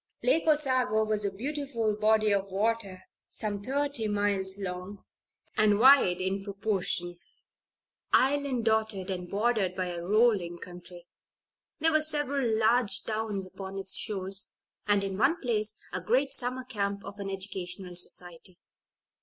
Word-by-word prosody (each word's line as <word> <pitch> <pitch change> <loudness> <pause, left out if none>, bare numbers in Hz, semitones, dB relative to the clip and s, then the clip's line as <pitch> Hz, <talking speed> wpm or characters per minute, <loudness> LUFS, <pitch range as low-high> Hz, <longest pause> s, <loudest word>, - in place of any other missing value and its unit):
Lake 325 -10 +2
Osago 255 -8 +3
was 215 -1 +1
a 200 - 0
beautiful 240 -1 -2
body 215 0 +3
of 200 0 -1
water, 200 -1 -1 0.3
some 205 -2 -3
thirty 275 -1 -1
miles 200 -2 0
long, 190 +1 -6 0.5
and 215 -2 +4
wide 240 -7 +6
in 190 +1 -1
proportion; 195 -4 -2 0.9
island 270 -3 +2
dotted 220 -4 0
and 180 -1 -5
bordered 205 -3 0
by 185 -1 -2
a 175 -1 -5
rolling 200 -3 +2
country. 175 0 -11 0.7
There 325 +1 +3
were 310 0 +3
several 290 -4 0
large 220 -3 +2
towns 215 -3 -2
upon 190 +1 -8
its 195 -1 -2
shores, 195 -1 -2 0.3
and, 205 -1 +3
in 195 0 -3
one 295 +8 +3
place, 215 -5 0 0.2
a - - -2
great 270 +4 +1
summer 255 +1 0
camp 200 -5 -3
of 200 +1 -9
an 200 -1 -4
educational 190 -1 -6
society. 175 0 -4
205 Hz, 135 wpm, -29 LUFS, 190-240 Hz, 0.9 s, wide